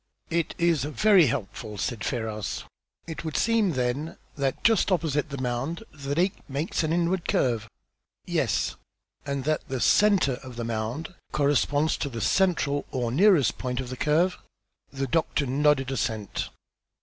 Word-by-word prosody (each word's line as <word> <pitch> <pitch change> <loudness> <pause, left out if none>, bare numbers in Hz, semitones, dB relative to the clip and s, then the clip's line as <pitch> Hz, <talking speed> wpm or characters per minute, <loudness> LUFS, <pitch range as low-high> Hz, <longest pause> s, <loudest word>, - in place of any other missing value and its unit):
"It 165 -1 0
is 170 -5 +2
very 170 - +5
helpful," 110 -1 -4
said 110 +1 -2
Ferrars. 110 -5 -3 0.4
"It 165 -1 -6
would 160 -2 -3
seem, 225 -6 +2
then, 130 +5 -2 0.2
that 135 -2 -1
just 225 -3 +4
opposite 155 -4 +1
the 140 - -5
mound 130 - -2
the 140 -1 -4
lake 185 +4 +1
makes 140 +7 -1
an 155 -1 -1
inward 175 +1 0
curve?" 115 -4 +1 0.6
"Yes." - - 0 0.5
"And 140 -1 -2
that 155 +3 -1
the 130 -1 -2
centre 185 - +4
of 130 -2 -10
the 120 - -4
mound 115 +9 -3 0.2
corresponds 145 +1 +2
to 140 - -2
the 115 -3 -5
central 145 - +1
or 120 -3 -2
nearest 170 - +4
point 125 0 -2
of 130 -2 -4
the - - -3
curve?" 165 +7 +2 0.5
The 135 0 -2
doctor 155 0 0
nodded 135 0 +2
assent. 110 -6 -2
140 Hz, 150 wpm, -26 LUFS, 125-165 Hz, 0.6 s, very